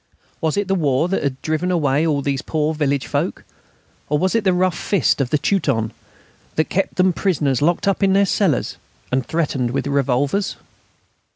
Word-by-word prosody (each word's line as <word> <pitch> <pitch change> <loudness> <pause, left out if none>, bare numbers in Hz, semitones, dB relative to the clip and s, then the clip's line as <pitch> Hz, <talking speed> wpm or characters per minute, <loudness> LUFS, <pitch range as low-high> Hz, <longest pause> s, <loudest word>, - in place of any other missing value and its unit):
Was 160 +3 0
it 205 -1 0
the 195 - +1
war 150 -3 +1
that 195 - 0
had 135 -2 -2
driven 155 +3 -1
away 155 -3 +1
all 145 -3 0
those 135 -1 -1
poor 155 0 -1
village 140 -3 0
folk, - - -2 0.7
or 150 - +2
was 185 +4 +1
it 225 -2 +1
the 190 - +3
rough 180 -1 +1
fist 180 -7 +1
of 130 - -1
the 150 - +2
Teuton 140 - 0 0.6
that 155 - +1
kept 195 +1 0
them 185 0 +3
prisoners 150 - 0
locked 175 +5 +1
up 195 - +1
in 195 -1 +3
their 200 +1 +4
cellars 185 - 0 0.3
and 130 +1 +1
threatened 140 -4 -1
with 125 - -2
revolvers? 140 +6 0
155 Hz, 185 wpm, -20 LUFS, 140-185 Hz, 0.7 s, their